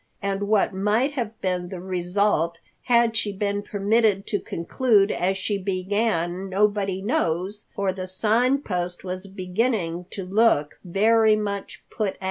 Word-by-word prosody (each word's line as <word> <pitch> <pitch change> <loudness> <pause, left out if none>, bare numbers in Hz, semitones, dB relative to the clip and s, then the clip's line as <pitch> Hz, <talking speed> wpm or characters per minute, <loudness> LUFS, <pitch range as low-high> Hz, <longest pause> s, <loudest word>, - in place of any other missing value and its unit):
And 200 0 -2
what 210 -2 +2
might 210 +8 +1
have 230 -6 -4
been 180 -1 -1
the 185 - -6
result 180 -2 0 0.3
had 235 -2 +3
she 210 -2 0
been 200 +1 -1
permitted 205 0 +1
to 205 - 0
conclude 205 +3 +1
as 190 +2 0
she 200 +1 -2
began 190 -1 -1
nobody 195 -1 +1
knows, 195 -1 -1
for 195 -2 0
the 185 0 -5
Sign 235 +8 +2
Post 180 -2 -3
was 185 +1 -5
beginning 185 -2 -2
to 195 - -6
look 185 -7 +2
very 215 +4 +4
much 200 -2 -4
put 210 -3 -1
out. - - -24
200 Hz, 145 wpm, -24 LUFS, 185-215 Hz, 0.3 s, very